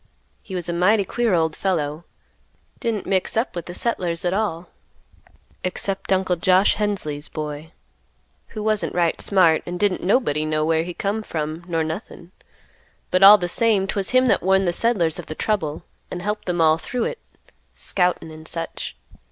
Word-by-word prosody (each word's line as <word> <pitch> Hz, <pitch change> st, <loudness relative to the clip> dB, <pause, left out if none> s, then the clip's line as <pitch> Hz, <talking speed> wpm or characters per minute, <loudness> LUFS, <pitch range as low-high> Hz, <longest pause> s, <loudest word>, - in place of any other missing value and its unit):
He 190 Hz, -, -8 dB
was 175 Hz, -1 st, -3 dB
a 170 Hz, -, -2 dB
mighty 195 Hz, +4 st, +3 dB
queer 235 Hz, -1 st, +1 dB
old 160 Hz, -2 st, +1 dB
fellow; 160 Hz, -4 st, -2 dB, 0.7 s
didn't 225 Hz, -4 st, -2 dB
mix 190 Hz, +2 st, 0 dB
up 225 Hz, -3 st, 0 dB
with 175 Hz, -, -5 dB
the 175 Hz, -, -7 dB
settlers 180 Hz, -8 st, -1 dB
at 175 Hz, -, +1 dB
all, 185 Hz, -5 st, -2 dB, 1.0 s
except 190 Hz, +2 st, -2 dB
Uncle 185 Hz, -1 st, +2 dB
Josh 185 Hz, +3 st, +4 dB
Hensley's 175 Hz, -8 st, -2 dB
boy 150 Hz, 0 st, -6 dB, 0.8 s
who 215 Hz, -2 st, -7 dB
wasn't 215 Hz, -1 st, 0 dB
right 170 Hz, -2 st, +1 dB
smart, 175 Hz, -5 st, +3 dB
and 175 Hz, 0 st, -4 dB
didn't 205 Hz, -3 st, +1 dB
nobody 180 Hz, -, +1 dB
know 155 Hz, 0 st, 0 dB
where 160 Hz, 0 st, +2 dB
he 175 Hz, +1 st, -6 dB
come 205 Hz, +2 st, -2 dB
from 155 Hz, -3 st, -4 dB
nor 165 Hz, -2 st, 0 dB
nothing; 170 Hz, +1 st, -7 dB, 0.8 s
but 185 Hz, -, +2 dB
all 200 Hz, +2 st, +10 dB
the 175 Hz, -3 st, -2 dB
same, 210 Hz, +1 st, +2 dB
'twas 195 Hz, 0 st, -2 dB
him 255 Hz, 0 st, +4 dB
that 250 Hz, -, +3 dB
warned 190 Hz, 0 st, +2 dB
the 175 Hz, -, +1 dB
settlers 175 Hz, -8 st, +1 dB
of -, -, -8 dB
the 155 Hz, -, -6 dB
trouble, 160 Hz, -8 st, -2 dB, 0.3 s
and 175 Hz, -1 st, -6 dB
helped 210 Hz, +2 st, -3 dB
them 175 Hz, -2 st, -1 dB
all 160 Hz, 0 st, +4 dB
through 245 Hz, +7 st, -3 dB
it, 475 Hz, -, -3 dB, 0.6 s
scoutin' 180 Hz, -3 st, -1 dB
and 155 Hz, 0 st, -10 dB
such. 165 Hz, 0 st, -5 dB
180 Hz, 175 wpm, -22 LUFS, 165-205 Hz, 1.0 s, all